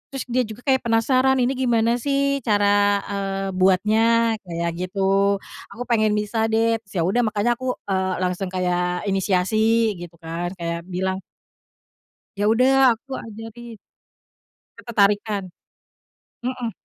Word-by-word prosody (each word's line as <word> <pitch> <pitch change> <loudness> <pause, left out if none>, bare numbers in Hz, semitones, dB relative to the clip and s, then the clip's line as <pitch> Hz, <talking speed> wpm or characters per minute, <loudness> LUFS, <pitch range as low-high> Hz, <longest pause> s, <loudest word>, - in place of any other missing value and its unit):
terus 270 - -3
dia 255 +1 +2
juga 220 +2 -10
kayak 265 -2 +3
penasaran, 255 +3 +2
"Ini 255 +2 +1
gimana 235 -2 +2
sih 280 +1 0
cara, 205 -2 +2
eee, 195 -1 -3
buatnya?" 220 +5 +3
kayak 170 -2 -3
gitu. 195 +2 +1 0.4
"Aku 245 - -4
pengen 215 -2 +3
bisa 220 +2 0
deh," 225 +1 +2
terus 200 - -19
ya 165 - +2
udah 220 +7 +2
makanya 215 +3 +1
aku, 255 -1 -2
eee, 190 -1 0
langsung 180 +1 -1
kayak 180 -1 -1
inisiasi 215 +4 +2
gitu 175 -1 -9
kan. 170 +2 -3
Kayak 170 -1 -3
bilang, 190 +1 -2 1.2
"Ya 205 - 0
udah 255 +3 +5
aku 265 +4 -8
ajarin" 225 +1 -9 1.1
ketertarikan. 205 -2 +1 1.0
Mhm. 250 -1 -3
210 Hz, 130 wpm, -22 LUFS, 190-235 Hz, 1.2 s, udah